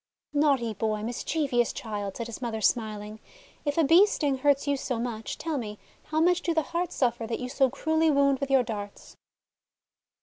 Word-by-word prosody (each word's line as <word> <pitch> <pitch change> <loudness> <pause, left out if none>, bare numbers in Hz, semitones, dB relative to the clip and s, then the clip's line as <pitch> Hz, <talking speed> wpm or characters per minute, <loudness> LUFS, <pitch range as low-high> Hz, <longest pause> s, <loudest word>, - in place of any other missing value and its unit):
' - - -61
'Naughty 275 -6 +2
boy, 215 +1 -2
mischievous 245 +1 0
child," 205 -3 -5
said 235 - -3
his 235 +2 -8
mother, 230 -3 -3
smiling, 215 -1 -1 0.5
:<if 290 +1 -1
a 330 - +5
Bee's 345 +8 +6
sting 280 -8 0
hurts 285 +1 +2
you 285 - +2
so 260 -2 -3
much, 230 -2 -4
tell 320 -4 -2
me, 210 -3 -6 0.3
how 310 +1 -1
much 355 +2 +3
do 340 -2 -1
the 320 - +2
hearts 345 0 -1
suffer 235 -3 0
that 230 - -3
you 250 - -4
so 270 0 +2
cruelly 315 +4 +1
wound 280 -2 +3
with 275 -1 -3
your 270 -2 +4
darts?' 205 -3 -7
260 Hz, 195 wpm, -27 LUFS, 225-295 Hz, 0.5 s, Bee's